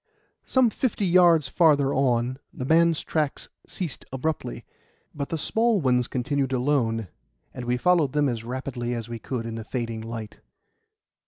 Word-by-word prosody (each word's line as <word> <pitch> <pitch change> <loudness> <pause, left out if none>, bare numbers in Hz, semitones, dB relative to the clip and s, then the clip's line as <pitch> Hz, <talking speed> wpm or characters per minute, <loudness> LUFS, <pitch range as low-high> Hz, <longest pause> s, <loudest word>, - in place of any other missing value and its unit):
Some 255 -4 +3
fifty 215 -3 -1
yards 170 -5 +5
farther 145 -2 +3
on, 125 -1 +1
the 125 - -6
man's 165 +2 +3
tracks 150 -3 -2 0.2
ceased 175 -7 -5
abruptly, 135 - -3 0.5
but 140 -1 -4
the 165 - -2
small 225 +6 +1
ones 125 -5 +2
continued 135 +1 -1
alone; 120 -5 +1 0.5
and 125 - -6
we 125 +1 +1
followed 160 -1 +2
them 150 -1 +2
as 115 -3 -2
rapidly 125 0 -4
as 115 0 -6
we 115 -1 -5
could 115 +1 -4
in 115 - -5
the 115 0 -5
fading 115 -1 -4
light. 115 -1 -7
130 Hz, 155 wpm, -25 LUFS, 120-160 Hz, 0.5 s, yards